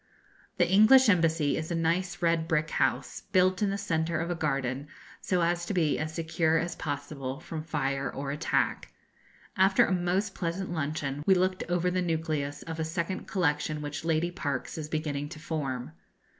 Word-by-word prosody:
The - - +4
English 220 +6 +7
Embassy 165 -5 +3
is 160 0 -4
a 170 - -1
nice 175 +3 0
red 165 -1 +2
brick 165 -1 0
house, - - 0
built 185 -1 +3
in 205 - +2
the 200 - -1
centre 165 -4 -1
of 170 +1 -2
a - - -1
garden, 140 -3 -1 0.3
so 180 -2 +1
as 175 +1 +1
to 200 - -2
be 160 -4 +2
as 155 0 -2
secure 160 0 +1
as 170 +1 -1
possible 140 -2 -4
from 160 -1 -6
fire 140 -3 -2
or 140 0 -4
attack. 150 +3 0 0.6
After 190 0 +5
a - - -2
most 185 +3 0
pleasant 175 +2 -3
luncheon 145 -2 -2
we 190 - +7
looked 185 +1 +1
over 175 0 +1
the 185 0 0
nucleus 155 -4 -2
of 165 0 -6
a - - +1
second 170 +3 -3
collection 150 -4 0
which 145 0 -5
Lady 165 +1 +1
Parkes 145 -5 -3
is 155 -2 -5
beginning 145 -2 -2
to 155 - -9
form. 135 - -3
165 Hz, 180 wpm, -29 LUFS, 150-180 Hz, 0.6 s, English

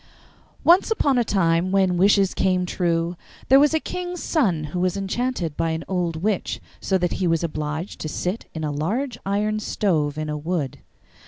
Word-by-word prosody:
Once 355 +6 +5
upon 285 - +2
a - - +3
time 180 -4 +1
when 190 -2 +3
wishes 195 +1 +4
came 185 -1 +1
true 170 -1 0 0.3
there 270 +1 +8
was 295 +1 +5
a 320 - +2
king's 360 +2 -5
son 195 - +1
who 180 - -1
was 185 +1 0
enchanted 195 - -2
by 165 0 0
an 160 0 -2
old 175 -3 -1
witch, 195 +4 -1 0.2
so 190 - +1
that 180 -1 0
he 185 - 0
was 165 0 +1
obliged 155 +2 -4
to 155 - -3
sit 180 +7 -3
in 160 - -4
a 150 - -1
large 220 - -2
iron 210 +2 0
stove 155 -9 0
in 155 0 -3
a 150 - -2
wood. 150 -3 -3
180 Hz, 185 wpm, -23 LUFS, 165-215 Hz, 0.3 s, there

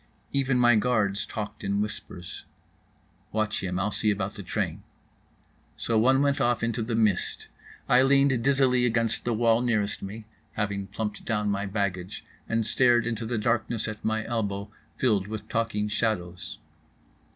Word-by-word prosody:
Even 135 -2 +2
my 120 -1 +5
guards 105 -3 +1
talked 105 -2 -6
in 100 +1 0
whispers. 95 -4 -5 0.9
"Watch 110 -1 0
him, 90 -1 -2
I'll 100 +3 0
see 105 - 0
about 100 -1 -1
the - - -8
train." 90 - -2 1.0
So 115 - -1
one 130 +5 +4
went 140 -1 +1
off 120 -2 +1
into 115 0 0
the 115 +1 -2
mist. 110 -5 0 0.4
I 125 - +6
leaned 135 -2 +4
dizzily 130 -2 +3
against 115 -1 0
the 120 - +1
wall 115 +1 +3
nearest 110 -4 0
me 105 +3 -7 0.3
(having 100 -2 -2
plumped 105 -1 -4
down 105 -2 0
my 100 0 -1
baggage) 95 -3 -3 0.2
and 115 -1 +1
stared 120 0 +4
into 115 -1 -2
the 120 0 -1
darkness 115 0 0
at 105 -1 -6
my 110 0 0
elbow, 100 -3 -2 0.3
filled 105 -6 +2
with 110 0 -6
talking 110 -2 -1
shadows. 95 -5 -2
110 Hz, 155 wpm, -27 LUFS, 100-120 Hz, 1.0 s, I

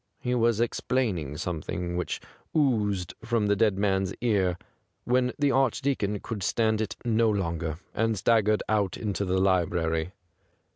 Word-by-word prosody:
He 125 - -1
was 115 -2 +2
explaining 110 - -1
something 85 +1 -3
which 90 - -2 0.4
oozed 105 - +1
from 115 -2 +1
the 105 0 +3
dead 105 -2 +2
man's 95 -1 0
ear, 95 -7 +1 0.5
when 125 0 +2
the 145 -2 +2
Arch 135 -3 +2
deacon 105 -7 -1
could 110 -3 -5
stand 110 +3 +1
it 110 - -3
no 115 -1 +3
longer, 85 -6 -2 0.2
and 110 0 +1
staggered 110 0 +3
out 105 -3 +1
into 100 -2 -2
the 95 0 0
library. 85 -2 +1
105 Hz, 145 wpm, -27 LUFS, 90-115 Hz, 0.5 s, the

